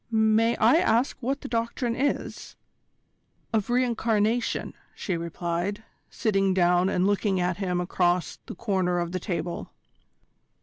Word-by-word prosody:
"May 220 +1 +3
I 230 +7 +5
ask 240 -4 +2
what 270 +3 -2
the - - -6
Doctrine 230 +1 -1
is?" 280 +3 -2 1.0
"Of 215 -1 0
re 250 +1 +3
incarnation," 230 0 0 0.2
she 190 - -3
replied, 170 +4 -3 0.3
sitting 195 -4 +1
down 180 0 +3
and 180 -1 +1
looking 200 -1 +1
at 180 0 0
him 180 -3 -1
across 180 -1 0
the - - -7
corner 185 -4 0
of 170 -1 -2
the 185 - -2
table. 175 -2 -4
200 Hz, 135 wpm, -26 LUFS, 180-230 Hz, 1.0 s, I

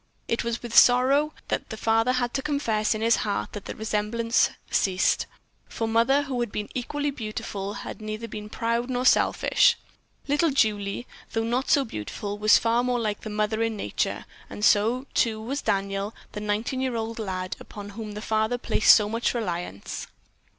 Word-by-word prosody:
It 230 - 0
was 235 0 -3
with 235 -1 -5
sorrow 270 +5 +6 0.2
that - - -2
the 220 - -6
father 225 +3 +2
had 245 -1 -1
to 270 - 0
confess 230 -8 0
in 215 - -4
his 230 +1 +4
heart 205 -1 -2
that 205 - -7
there - - -6
the - - -18
resemblance 220 +2 +1 0.2
ceased, 185 -1 +2 0.4
for 225 - -3
the 225 - -3
mother, 265 +5 +4
who 265 -3 -3
had 240 -3 -1
been 210 -1 -4
equally 290 +3 -2
beautiful, 210 -4 -5
had - - -7
been 215 - -9
neither 215 -1 -6
proud 230 +3 -1
nor 250 0 -1
selfish. 480 - +4 0.5
Little 295 +4 +2
Julie, 215 -4 0 0.3
though 225 - 0
not 245 +4 -1
so 280 -2 +4
beautiful, 205 - -5
was 215 +1 +6
far 230 +1 +2
more 250 0 +1
like 215 -2 -2
the 215 - -6
mother 215 +1 -1
in 225 -1 0
nature, - - -2 0.2
and 210 - -2
so, 230 +7 +3
too, 220 -2 +1
was 265 +6 -3
Daniel, 200 0 -1 0.2
the - - -5
nineteen 215 +5 -1
year 260 -2 -1
old 225 0 -3
lad 185 -3 -3
upon 205 -1 -9
whom 215 0 -7
the 210 +1 -7
father 220 +2 +1
placed 225 - +5
so 210 -2 +2
much 230 +3 -1
reliance. 175 - -4
225 Hz, 185 wpm, -26 LUFS, 210-245 Hz, 0.5 s, sorrow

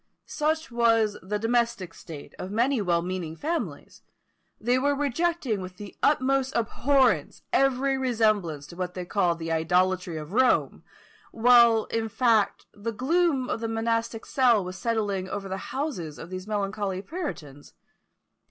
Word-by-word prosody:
Such 315 -1 -1
was 225 -3 +3
the 205 +3 -2
domestic 230 -5 0
state 155 -5 -10
of 185 - -5
many 235 +4 +1
well 170 -3 +1
meaning 180 -3 -4
families: 325 - -4 0.6
they 245 +3 +2
were 285 +2 +1
rejecting 285 - -1
with 185 0 -8
the 205 0 -9
utmost 270 -2 +2
abhorrence 265 +3 +1
every 270 0 +2
resemblance 215 - +1
to 170 - -12
what 180 0 -4
they 180 -1 -4
called 175 -3 +1
the 165 0 -4
idolatry 180 +1 +1
of 155 +4 -8
Rome, 255 +2 +2 0.5
while, 235 -1 +5
in 225 -1 -1
fact, 225 -3 +2
the 210 +3 -4
gloom 275 +3 +1
of - - -2
the 230 - -3
monastic 230 0 -1
cell 240 -6 +3
was 185 +1 -6
settling 205 -4 -1
over 200 0 -4
the 190 0 -3
houses 260 - -4
of 170 - -10
these 185 +1 -6
melancholy 200 -2 -2
puritans. 165 - -7
220 Hz, 145 wpm, -26 LUFS, 185-255 Hz, 0.6 s, while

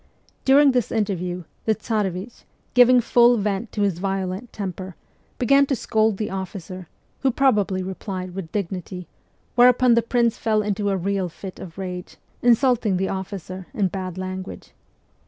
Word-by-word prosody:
During 275 +1 +6
this 250 -4 0
interview, 180 -5 -2 0.2
the 220 - +2
Tsarevich, 210 -1 -3 0.3
giving 250 0 +6
full 240 +1 +5
vent 205 +1 -2
to 205 - 0
his 190 -4 0
violent 195 +3 -3
temper, 185 -2 -6 0.4
began 275 +3 +4
to 270 - +1
scold 220 -2 +1
the 210 -1 -3
officer, 185 -1 -6 0.3
who 270 - +2
probably 210 -8 +2
replied 185 -1 -5
with 180 -4 -6
dignity, 180 -2 -4 0.5
whereupon 250 0 +5
the 235 - +4
prince 235 0 +1
fell 215 -2 +1
into 205 0 -1
a 195 - +1
real 190 0 -1
fit 185 +3 -9
of 170 -2 -10
rage, 180 -2 -6 0.2
insulting 240 -4 +3
the 190 +1 -1
officer 190 -1 -6
in 195 -3 +1
bad 185 -1 -5
language. 185 0 -6
200 Hz, 150 wpm, -23 LUFS, 185-235 Hz, 0.5 s, During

